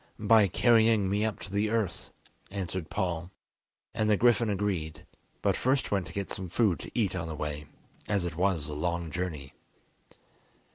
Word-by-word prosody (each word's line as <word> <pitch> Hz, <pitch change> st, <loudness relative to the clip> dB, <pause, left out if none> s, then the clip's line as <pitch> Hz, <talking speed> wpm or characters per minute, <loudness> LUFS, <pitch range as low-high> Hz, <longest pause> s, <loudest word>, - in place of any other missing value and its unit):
"By 105 Hz, -1 st, +5 dB
carrying 110 Hz, 0 st, +4 dB
me 100 Hz, +2 st, +1 dB
up 110 Hz, -1 st, -1 dB
to 100 Hz, -, -8 dB
the 105 Hz, +1 st, +1 dB
earth," 110 Hz, -4 st, -2 dB, 0.4 s
answered 95 Hz, -3 st, -4 dB
Paul; 85 Hz, -1 st, -2 dB, 0.6 s
and 110 Hz, 0 st, 0 dB
the 105 Hz, -, +4 dB
griffin 120 Hz, -1 st, +4 dB
agreed, 90 Hz, -6 st, -2 dB, 0.4 s
but -, -, +3 dB
first 130 Hz, +2 st, +1 dB
went 95 Hz, -3 st, 0 dB
to -, -, -10 dB
get 100 Hz, -1 st, -4 dB
some 95 Hz, -2 st, -4 dB
food 100 Hz, -2 st, +2 dB
to -, -, -8 dB
eat 100 Hz, -5 st, +1 dB
on 80 Hz, -, -3 dB
the 80 Hz, -, -5 dB
way, 75 Hz, 0 st, -4 dB, 0.4 s
as 100 Hz, -4 st, +1 dB
it 85 Hz, -3 st, -4 dB
was 90 Hz, -4 st, +1 dB
a 75 Hz, -, -5 dB
long 85 Hz, +1 st, -2 dB
journey. 80 Hz, -6 st, -4 dB
95 Hz, 175 wpm, -29 LUFS, 85-105 Hz, 0.6 s, By